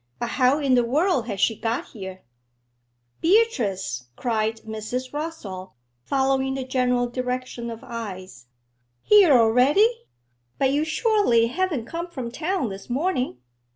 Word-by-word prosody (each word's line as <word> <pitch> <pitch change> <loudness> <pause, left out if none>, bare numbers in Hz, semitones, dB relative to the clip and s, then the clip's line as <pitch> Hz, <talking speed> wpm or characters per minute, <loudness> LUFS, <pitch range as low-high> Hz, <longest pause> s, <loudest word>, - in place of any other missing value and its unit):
'But 240 - -3
how 255 +2 +3
in 280 -4 +1
the 245 -1 +4
world 275 - +1
has 200 -4 -4
she 225 - +2
got 225 +2 -3
here?' 190 -3 -9 1.0
'Beatrice!' 225 - +1
cried 220 -2 -1
Mrs. 220 +4 -5
Rossall, 260 - -6 0.3
following 265 0 +1
the 265 - -3
general 250 -1 +1
direction 250 -1 -4
of 230 0 -8
eyes. 190 - -8 0.6
'Here 410 -6 +6
already! 280 - +4 0.5
But 270 -1 +2
you 295 +2 +1
surely 320 - +3
haven't 320 -5 -1
come 335 +6 -5
from 260 -8 -6
town 320 - -1
this 195 +3 -9
morning?' 255 - -1
250 Hz, 130 wpm, -24 LUFS, 225-305 Hz, 1.0 s, Here